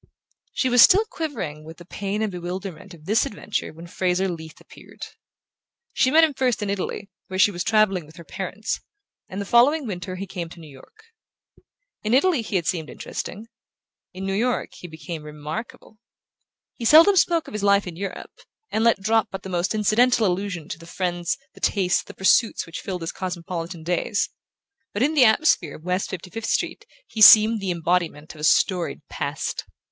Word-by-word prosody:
She 260 Hz, -, 0 dB
was 245 Hz, -1 st, +5 dB
still 405 Hz, -, +7 dB
quivering 185 Hz, -, -5 dB
with 160 Hz, +1 st, -11 dB
the 175 Hz, -, -13 dB
pain 200 Hz, +4 st, -3 dB
and 215 Hz, -, -1 dB
bewilderment 180 Hz, +1 st, -7 dB
of 155 Hz, -2 st, -18 dB
this 215 Hz, +5 st, +2 dB
adventure 210 Hz, 0 st, -4 dB
when 165 Hz, +2 st, -12 dB
Fraser 180 Hz, +2 st, 0 dB
Leath 160 Hz, -3 st, -7 dB
appeared. -, -, -12 dB, 0.9 s
She 255 Hz, -, +3 dB
met 320 Hz, +4 st, +6 dB
him 315 Hz, -2 st, +3 dB
first 250 Hz, -5 st, 0 dB
in 200 Hz, -, -2 dB
Italy, 200 Hz, +1 st, -4 dB, 0.2 s
where 185 Hz, -, -5 dB
she 205 Hz, -, +5 dB
was 175 Hz, -2 st, -3 dB
travelling 195 Hz, -7 st, +2 dB
with 155 Hz, -, -17 dB
her 170 Hz, -, -11 dB
parents; 190 Hz, +5 st, -4 dB, 0.5 s
and 190 Hz, -, -6 dB
the 200 Hz, -, -3 dB
following 265 Hz, +8 st, +4 dB
winter 185 Hz, -3 st, -5 dB
he 195 Hz, +2 st, -5 dB
came 175 Hz, -3 st, -6 dB
to 170 Hz, -, -13 dB
New 155 Hz, -3 st, -12 dB
York. 140 Hz, -, -17 dB, 1.0 s
In 215 Hz, +3 st, +1 dB
Italy 315 Hz, -1 st, +3 dB
he 215 Hz, -, -5 dB
had 175 Hz, -3 st, +1 dB
seemed 160 Hz, -3 st, -2 dB
interesting: 215 Hz, +4 st, -7 dB, 0.6 s
in 190 Hz, +1 st, -7 dB
New 195 Hz, -, -1 dB
York 240 Hz, +5 st, -1 dB
he 175 Hz, -, -10 dB
became 160 Hz, 0 st, -7 dB
remarkable. 150 Hz, +9 st, -8 dB, 0.7 s
He 235 Hz, -, -7 dB
seldom 330 Hz, -, +7 dB
spoke 340 Hz, -3 st, +3 dB
of -, -, -10 dB
his 210 Hz, -, -3 dB
life 200 Hz, 0 st, +4 dB
in 175 Hz, -3 st, -7 dB
Europe, 195 Hz, +2 st, -6 dB, 0.4 s
and 220 Hz, -, 0 dB
let 230 Hz, -4 st, +3 dB
drop 220 Hz, +1 st, +2 dB
but 195 Hz, -, -7 dB
the 190 Hz, -, -7 dB
most 180 Hz, +3 st, -1 dB
incidental 225 Hz, +3 st, +3 dB
allusions 180 Hz, -3 st, -2 dB
to -, -, -13 dB
the 165 Hz, -, -13 dB
friends, 175 Hz, -1 st, -2 dB, 0.2 s
the -, -, -17 dB
tastes, 185 Hz, -3 st, +1 dB
the -, -, -13 dB
pursuits 215 Hz, +4 st, +2 dB
which 165 Hz, -, -7 dB
filled 185 Hz, -3 st, -5 dB
his 165 Hz, -, -3 dB
cosmopolitan 175 Hz, -2 st, -5 dB
days; 180 Hz, +5 st, -1 dB, 0.6 s
but 205 Hz, -, 0 dB
in 300 Hz, +3 st, +2 dB
the 275 Hz, -5 st, +6 dB
atmosphere 220 Hz, -, +3 dB
of 155 Hz, -, -14 dB
West 180 Hz, +2 st, -1 dB
Fifty 180 Hz, -1 st, -7 dB
fifth 225 Hz, 0 st, -5 dB
Street -, -, -2 dB, 0.2 s
he 220 Hz, -, -6 dB
seemed 220 Hz, +1 st, +9 dB
the 195 Hz, -, -3 dB
embodiment 170 Hz, -3 st, -1 dB
of 155 Hz, -, -12 dB
a -, -, -7 dB
storied 175 Hz, +2 st, +1 dB
past. -, -, -4 dB
190 Hz, 190 wpm, -23 LUFS, 175-220 Hz, 1.0 s, seemed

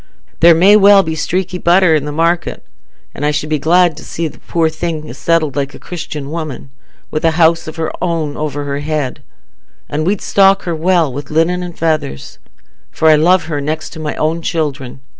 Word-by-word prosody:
There 170 Hz, 0 st, +7 dB
may 190 Hz, +5 st, +6 dB
well 200 Hz, -1 st, +6 dB
be 160 Hz, -, -3 dB
streaky 180 Hz, +3 st, -2 dB
butter 175 Hz, -1 st, +4 dB
i' -, -, +3 dB
the 150 Hz, +1 st, -5 dB
market. 165 Hz, +3 st, -1 dB, 0.5 s
An' 145 Hz, -, -7 dB
I 150 Hz, -, +2 dB
should 150 Hz, +1 st, -2 dB
be 155 Hz, -, +1 dB
glad 175 Hz, +2 st, +3 dB
to -, -, -10 dB
see 165 Hz, 0 st, -4 dB
the -, -, -12 dB
poor 165 Hz, -1 st, 0 dB
thing 155 Hz, -3 st, -4 dB
settled 155 Hz, 0 st, 0 dB
like 140 Hz, -1 st, -3 dB
a -, -, -12 dB
Christian 150 Hz, -5 st, -7 dB
woman, 155 Hz, -4 st, -6 dB, 0.4 s
with 155 Hz, -, -3 dB
a 165 Hz, -, +4 dB
house 165 Hz, -1 st, +3 dB
of 155 Hz, -, -7 dB
her 160 Hz, -1 st, -3 dB
own 165 Hz, -4 st, -2 dB
over 145 Hz, -1 st, -4 dB
her 140 Hz, 0 st, -3 dB
head; 145 Hz, -3 st, -3 dB, 0.7 s
and 150 Hz, +1 st, -2 dB
we'd 200 Hz, 0 st, +1 dB
stock 195 Hz, 0 st, +3 dB
her 170 Hz, -, -2 dB
well 165 Hz, -3 st, +1 dB
wi' 140 Hz, -, -4 dB
linen 165 Hz, +3 st, +1 dB
and 175 Hz, -2 st, -7 dB
feathers, 155 Hz, -, -2 dB, 0.5 s
for 160 Hz, -, +2 dB
I 155 Hz, -, +7 dB
love 175 Hz, +5 st, +3 dB
her 150 Hz, -3 st, -4 dB
next 155 Hz, +2 st, -4 dB
to 160 Hz, -, -10 dB
my 155 Hz, -1 st, -4 dB
own 160 Hz, +2 st, -1 dB
children. 140 Hz, -6 st, -3 dB
160 Hz, 200 wpm, -15 LUFS, 150-170 Hz, 0.7 s, There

